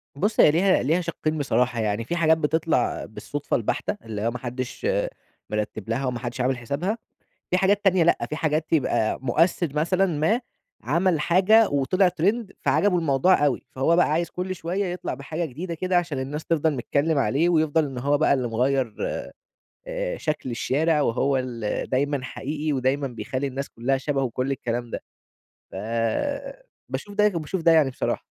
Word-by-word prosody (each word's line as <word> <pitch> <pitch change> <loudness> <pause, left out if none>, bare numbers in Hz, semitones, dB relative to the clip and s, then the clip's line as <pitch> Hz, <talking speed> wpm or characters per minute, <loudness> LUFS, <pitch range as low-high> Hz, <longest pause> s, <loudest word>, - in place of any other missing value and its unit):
بُصّ، 205 +9 -1
هي - - +8
ليها 185 +1 +3
ليها 160 +7 +2
شقِّين 155 -2 -2
بصراحة، 125 -3 +1
يعني 105 0 0
فيه 175 - -2
حاجات 160 -1 +4
بتطلع 160 +1 0
بالصدفة - - -4
البحتة، - - -1
اللي 105 -2 -5
هو 115 - +1
ما 125 - -5
حدش 125 - -4 0.6
مرتب 105 0 -3
لها، 130 +4 -1
وما 125 -2 -2
حدش 120 +1 -4
عامل 130 +1 +1
حسابها، 140 - -2 0.5
فيه 180 - +3
حاجات 200 +2 +2
تانية 185 -3 +4
لأ، 170 - +2
في 150 - -2
حاجات 155 -1 -1
تبقى 130 -8 +1
مؤثر 165 +6 +2
مثلًا 185 +5 +2
ما 175 +8 +1 0.4
عمل 165 - +1
حاجة 195 +7 +5
وطلع 145 +7 +2
ترند 195 +5 0
فعجبه 200 -3 +2
الموضوع 150 +1 +3
أوي، 135 -4 0
فهو 135 +6 +2
بقى 180 - +4
عايز 170 +1 0
كُلّ 185 +1 -3
شوية 180 +3 -2
يطلع 180 -5 -3
بحاجة 155 +6 -4
جديدة 165 +4 -5
كده 185 +2 0
عشان 160 -6 -2
الناس 145 +4 -4
تفضل 160 -2 +1
نتكلم 145 +4 0
عليه 145 +5 +2
ويفضل 160 -2 +3
إن 135 -3 -5
هو 145 +3 +1
بقى 155 - +4
اللي 125 -3 -1
مغيّر 125 0 0 0.9
آآ، - - -3
شكل 155 -5 -3
الشارع، 150 +6 +1
وهو 135 +1 +1
ال 120 -4 -2
دايمًا 140 +1 0
حقيقي، 150 +3 -3
ودايمًا 135 +1 0
بيخلي 130 +3 -4
الناس 135 +1 -4
كلّها 125 +4 -1
شبهه 135 0 -1
وكُلّ 130 +1 -2
الكلام 120 -3 -3
ده، - - -5 0.7
فباشوف 205 - -4
ده 210 0 +4
وباشوف 165 +2 -3
ده 165 - +5
يعني 155 -4 +5
بصراحة. 130 - -2
150 Hz, 170 wpm, -24 LUFS, 130-175 Hz, 0.9 s, هي